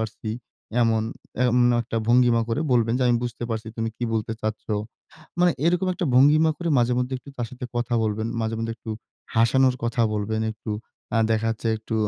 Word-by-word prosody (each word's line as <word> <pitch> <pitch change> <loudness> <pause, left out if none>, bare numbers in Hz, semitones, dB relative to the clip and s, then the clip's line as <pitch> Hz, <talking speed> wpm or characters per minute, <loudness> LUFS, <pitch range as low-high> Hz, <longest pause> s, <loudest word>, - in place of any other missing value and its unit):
পারছি।" 110 0 -4 0.5
এমন 115 -1 +2 0.5
এমন 125 0 +4 0.2
একটা 115 0 -5
ভঙ্গিমা 120 -1 +5
করে 115 +5 0
বলবেন 115 -2 +3
যে, 130 - +1
"আমি 120 - +4
বুঝতে 120 0 -4
পারছি 110 0 -3
তুমি 115 -1 -1
কি 120 - -2
বলতে 110 0 -1
চাচ্ছ।" 110 0 -3 0.8
মানে 175 -2 +5
এরকম 180 +2 +2
একটা 175 -2 -2
ভঙ্গিমা 150 +5 +6
করে 175 -1 -3
মাঝেমধ্যে 125 +2 +1
একটু 140 - -13
তার 120 -2 -2
সাথে 125 0 -8
কথা 120 0 0
বলবেন। 110 +1 -1
মাঝেমধ্যে 115 0 -2
একটু 110 - -8 0.4
হাসানোর 125 +3 +4
কথা 120 0 +1
বলবেন, 110 +1 -1
একটু 110 0 -8 0.5
আ - - +4
দেখা 110 0 +1
যাচ্ছে 115 0 -3
একটু 110 +1 -5
115 Hz, 180 wpm, -24 LUFS, 110-125 Hz, 0.8 s, ভঙ্গিমা